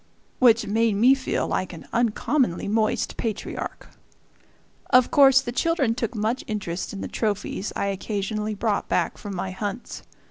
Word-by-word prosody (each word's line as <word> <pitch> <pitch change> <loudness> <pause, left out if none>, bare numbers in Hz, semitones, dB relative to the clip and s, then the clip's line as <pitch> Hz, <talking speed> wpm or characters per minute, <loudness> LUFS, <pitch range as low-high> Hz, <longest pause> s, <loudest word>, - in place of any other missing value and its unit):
which 230 -3 +5
made 220 0 +1
me 240 +6 +6
feel 270 -1 -1
like 185 -1 -2
an 165 - -11
uncommonly 235 - +1
moist 215 +1 0
patriarch. 220 -3 -4 1.0
Of 255 -2 +5
course 270 -2 +7
the 240 - -5
children 275 -2 +1
took 235 0 -3
much 220 +4 -1
interest 190 -5 -3
in 200 - -6
the - - -3
trophies 210 -2 -2
I - - -1
occasionally 210 +2 -2
brought 210 0 -1
back - - 0
from 205 -2 -6
my 185 +1 -3
hunts. 205 +4 -5
220 Hz, 150 wpm, -24 LUFS, 200-245 Hz, 1.0 s, course